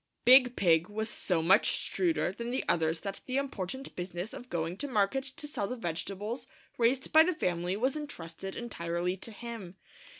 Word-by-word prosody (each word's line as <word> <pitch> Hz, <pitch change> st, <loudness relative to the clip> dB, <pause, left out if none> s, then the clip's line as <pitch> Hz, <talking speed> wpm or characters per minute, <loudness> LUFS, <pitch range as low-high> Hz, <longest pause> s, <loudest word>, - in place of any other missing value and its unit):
Big 255 Hz, -1 st, +8 dB
Pig 170 Hz, -2 st, +3 dB
was 220 Hz, +1 st, -2 dB
so 175 Hz, -6 st, 0 dB
much 190 Hz, +6 st, +5 dB
shrewder 340 Hz, -, 0 dB
than 235 Hz, +4 st, -5 dB
the 255 Hz, +2 st, -1 dB
others 160 Hz, 0 st, +1 dB
that 195 Hz, -1 st, -5 dB
the 255 Hz, +1 st, -1 dB
important 265 Hz, -1 st, -4 dB
business 180 Hz, +4 st, -5 dB
of 250 Hz, -2 st, -9 dB
going 170 Hz, 0 st, -2 dB
to 285 Hz, -, -3 dB
market 235 Hz, +2 st, +1 dB
to 270 Hz, +2 st, -4 dB
sell 290 Hz, -9 st, -2 dB
the 250 Hz, -, -3 dB
vegetables 205 Hz, +4 st, -4 dB, 0.3 s
raised 250 Hz, +3 st, +2 dB
by 315 Hz, -, +9 dB
the 350 Hz, +1 st, +3 dB
family 180 Hz, -, -1 dB
was 260 Hz, +5 st, +1 dB
intrusted 195 Hz, -, -6 dB
entirely 175 Hz, -5 st, -2 dB
to 195 Hz, +4 st, -6 dB
him. 220 Hz, -5 st, -8 dB
210 Hz, 175 wpm, -31 LUFS, 175-255 Hz, 0.3 s, by